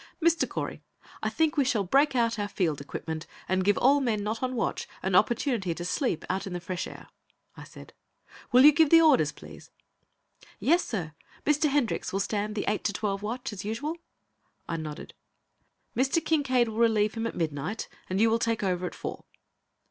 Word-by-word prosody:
"Mr. 335 Hz, 0 st, +2 dB
Correy, -, -, -4 dB, 0.4 s
I -, -, 0 dB
think 320 Hz, -1 st, +1 dB
we 285 Hz, -, +5 dB
shall 245 Hz, -6 st, +1 dB
break 275 Hz, +8 st, +3 dB
out 230 Hz, -2 st, +1 dB
our 205 Hz, -, -1 dB
field 165 Hz, -8 st, -1 dB
equipment 160 Hz, +3 st, -6 dB, 0.2 s
and 185 Hz, 0 st, +1 dB
give 205 Hz, +1 st, +3 dB
all 275 Hz, +3 st, +5 dB
men 225 Hz, -6 st, 0 dB
not 220 Hz, +2 st, -3 dB
on 255 Hz, 0 st, -1 dB
watch 230 Hz, -, -2 dB, 0.2 s
an 190 Hz, -, -1 dB
opportunity 225 Hz, -, +2 dB
to 175 Hz, -, -5 dB
sleep 245 Hz, -, -1 dB
out 190 Hz, +1 st, -2 dB
in 185 Hz, -, -5 dB
the 175 Hz, -, -3 dB
fresh 175 Hz, +1 st, -4 dB
air," -, -, -11 dB, 0.5 s
I -, -, -10 dB
said. -, -, -13 dB, 0.6 s
"Will 255 Hz, +3 st, +7 dB
you 300 Hz, -, +10 dB
give 300 Hz, +1 st, +4 dB
the 330 Hz, -, +8 dB
orders, 310 Hz, -5 st, +4 dB
please?" -, -, -13 dB, 0.9 s
"Yes, 340 Hz, +5 st, +3 dB
sir. 175 Hz, -9 st, -4 dB, 0.3 s
Mr. 300 Hz, +1 st, +3 dB
Hendricks 275 Hz, -5 st, 0 dB
will 195 Hz, -, -1 dB
stand 210 Hz, +1 st, -2 dB
the 205 Hz, -, -2 dB
eight 210 Hz, 0 st, 0 dB
to 205 Hz, -, +1 dB
twelve 200 Hz, -1 st, -2 dB
watch 240 Hz, +3 st, -4 dB
as 195 Hz, -, -6 dB
usual?" 235 Hz, +10 st, -3 dB, 0.7 s
I 165 Hz, -, -2 dB
nodded. 155 Hz, -2 st, -7 dB, 0.8 s
"Mr. 265 Hz, +5 st, +2 dB
Kincaide 270 Hz, -7 st, +1 dB
will 220 Hz, -, -7 dB
relieve 220 Hz, -2 st, +3 dB
him 225 Hz, 0 st, -2 dB
at -, -, -6 dB
midnight, 160 Hz, +5 st, -3 dB, 0.2 s
and 185 Hz, +1 st, -1 dB
you 225 Hz, +1 st, +4 dB
will 230 Hz, -, +2 dB
take 230 Hz, -2 st, 0 dB
over 180 Hz, -2 st, 0 dB
at -, -, -8 dB
four." -, -, -6 dB
225 Hz, 195 wpm, -28 LUFS, 190-265 Hz, 0.9 s, you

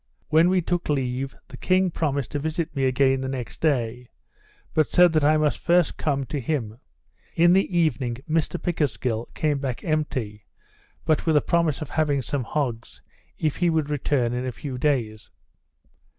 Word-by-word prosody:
When 160 Hz, +3 st, +5 dB
we 185 Hz, 0 st, +3 dB
took 175 Hz, 0 st, -2 dB
leave, 135 Hz, -1 st, -1 dB
the -, -, -11 dB
king 185 Hz, 0 st, +2 dB
promised 140 Hz, -6 st, -2 dB
to 145 Hz, -, -2 dB
visit 160 Hz, +1 st, -3 dB
me 135 Hz, -1 st, +1 dB
again 130 Hz, 0 st, +2 dB
the 130 Hz, -, -3 dB
next 130 Hz, -3 st, -6 dB
day; 125 Hz, -5 st, 0 dB, 0.6 s
but 155 Hz, -3 st, +2 dB
said 175 Hz, -2 st, +5 dB
that 155 Hz, -2 st, +2 dB
I 155 Hz, +1 st, +4 dB
must 155 Hz, -1 st, +1 dB
first 175 Hz, -2 st, +2 dB
come 140 Hz, -3 st, -1 dB
to 145 Hz, -, -3 dB
him. 120 Hz, -5 st, -3 dB, 0.6 s
In 175 Hz, +1 st, +5 dB
the 190 Hz, -1 st, +2 dB
evening 130 Hz, -7 st, +1 dB
Mr 165 Hz, +2 st, 0 dB
Pickersgill 125 Hz, -8 st, -1 dB
came 150 Hz, -2 st, 0 dB
back 130 Hz, -3 st, -4 dB
empty, 130 Hz, -10 st, -2 dB, 0.6 s
but 155 Hz, +1 st, +1 dB
with 160 Hz, -2 st, +4 dB
a -, -, +4 dB
promise 165 Hz, -3 st, +1 dB
of 150 Hz, -, -11 dB
having 145 Hz, -4 st, +1 dB
some 135 Hz, 0 st, -2 dB
hogs, 120 Hz, -5 st, -3 dB, 0.3 s
if 155 Hz, -2 st, -1 dB
he 175 Hz, -1 st, +2 dB
would 155 Hz, -3 st, 0 dB
return 130 Hz, -4 st, 0 dB
in 125 Hz, +1 st, -2 dB
a 130 Hz, -, -2 dB
few 130 Hz, 0 st, -6 dB
days. 120 Hz, -7 st, -1 dB
145 Hz, 175 wpm, -24 LUFS, 130-160 Hz, 0.6 s, When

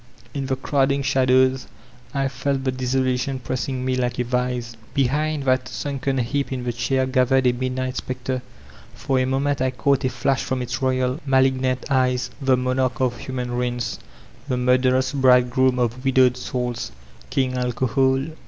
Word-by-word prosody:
In 140 Hz, -2 st, -3 dB
the 130 Hz, -, 0 dB
crowding 140 Hz, +1 st, +1 dB
shadows 130 Hz, 0 st, +3 dB, 0.4 s
I 135 Hz, -1 st, 0 dB
felt 135 Hz, +1 st, -2 dB
the 130 Hz, -, +1 dB
desolation 130 Hz, +1 st, 0 dB
pressing 130 Hz, +1 st, -3 dB
me 130 Hz, 0 st, +1 dB
like 125 Hz, -1 st, -1 dB
a 125 Hz, -, +1 dB
vise. 125 Hz, -1 st, -2 dB, 0.2 s
Behind 145 Hz, +3 st, +1 dB
that 130 Hz, -1 st, +1 dB
sunken 135 Hz, -1 st, -3 dB
heap 135 Hz, +4 st, -1 dB
in 130 Hz, -2 st, -3 dB
the 120 Hz, -1 st, -2 dB
chair 130 Hz, +3 st, 0 dB
gathered 130 Hz, 0 st, +2 dB
a 125 Hz, -, +5 dB
midnight 130 Hz, +1 st, -3 dB
specter; 130 Hz, 0 st, -3 dB, 0.5 s
for 135 Hz, -1 st, 0 dB
a 130 Hz, -, +2 dB
moment 135 Hz, +1 st, 0 dB
I 130 Hz, -, +2 dB
caught 130 Hz, +3 st, +1 dB
a 130 Hz, -, +2 dB
flash 130 Hz, +2 st, 0 dB
from 130 Hz, -1 st, -2 dB
its 125 Hz, -, -4 dB
royal, 130 Hz, +1 st, 0 dB
malignant 130 Hz, -1 st, +2 dB
eyes, 125 Hz, -2 st, +1 dB
the 135 Hz, -1 st, +4 dB
BConarch 130 Hz, 0 st, 0 dB
of 125 Hz, -2 st, 0 dB
human 125 Hz, -2 st, -4 dB
ruins, 120 Hz, -2 st, -2 dB, 0.5 s
tiie 125 Hz, -, 0 dB
murderous 130 Hz, +1 st, +2 dB
Brid^joom 130 Hz, -1 st, +4 dB
of 120 Hz, +1 st, -1 dB
widowed 130 Hz, -2 st, +4 dB
aouls, 125 Hz, -1 st, -3 dB, 0.4 s
King 130 Hz, -1 st, 0 dB
Alcohol. 130 Hz, +2 st, +1 dB
130 Hz, 160 wpm, -22 LUFS, 125-135 Hz, 0.5 s, a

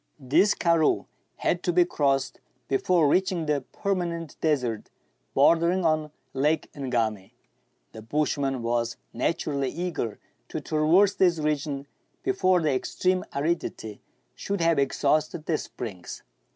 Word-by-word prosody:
This 155 Hz, +10 st, +3 dB
karroo 165 Hz, -3 st, +2 dB, 0.3 s
had 175 Hz, -, 0 dB
to 180 Hz, -, 0 dB
be 175 Hz, 0 st, +4 dB
crossed 135 Hz, -5 st, 0 dB, 0.3 s
before 160 Hz, +3 st, +2 dB
reaching 180 Hz, +1 st, +1 dB
the 150 Hz, -2 st, 0 dB
perma 195 Hz, -4 st, -1 dB
nent 165 Hz, -3 st, -6 dB
desert 125 Hz, -9 st, 0 dB, 0.5 s
bordering 170 Hz, +5 st, +4 dB
on 155 Hz, -1 st, +1 dB, 0.2 s
Lake 150 Hz, +3 st, 0 dB
Ngami. 115 Hz, -8 st, -2 dB, 0.6 s
The 110 Hz, -, -10 dB
bushman 135 Hz, +1 st, -1 dB
was 115 Hz, 0 st, -1 dB, 0.2 s
naturally 140 Hz, +1 st, -1 dB
eager 165 Hz, -10 st, -3 dB, 0.3 s
to -, -, -3 dB
traverse 165 Hz, +6 st, +3 dB
this 180 Hz, -4 st, +3 dB
region 150 Hz, -2 st, -2 dB, 0.4 s
before 185 Hz, -, +2 dB
the 150 Hz, -3 st, +2 dB
extreme 185 Hz, +7 st, 0 dB
aridity 140 Hz, -8 st, -2 dB, 0.3 s
should 200 Hz, 0 st, -3 dB
have 165 Hz, -3 st, +3 dB
exhausted 150 Hz, +3 st, +1 dB
the 160 Hz, -3 st, 0 dB
springs. 100 Hz, -8 st, -7 dB
155 Hz, 125 wpm, -26 LUFS, 135-170 Hz, 0.6 s, be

